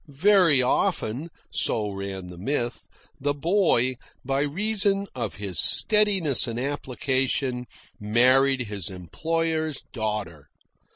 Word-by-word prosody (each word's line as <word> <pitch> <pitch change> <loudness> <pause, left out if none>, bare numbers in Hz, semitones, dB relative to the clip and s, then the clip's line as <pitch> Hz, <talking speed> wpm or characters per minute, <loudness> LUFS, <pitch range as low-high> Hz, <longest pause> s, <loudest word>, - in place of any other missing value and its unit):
Very 160 -2 +4
often 125 +4 -1 0.2
so 105 -2 -1
ran 95 -1 -6
the 90 -1 -11
myth 120 +2 -3 0.3
the 145 +1 -1
boy, 145 - +1 0.3
by 135 +1 0
reason 200 +5 0
of 125 - -4
his 100 -5 -4
steadiness 190 - +4
and 115 0 -4
application, 130 -2 -2 0.3
married 130 +5 +3
his 105 -6 -3
employer's 160 - -3
daughter. 105 - -4
130 Hz, 105 wpm, -25 LUFS, 105-160 Hz, 0.3 s, Very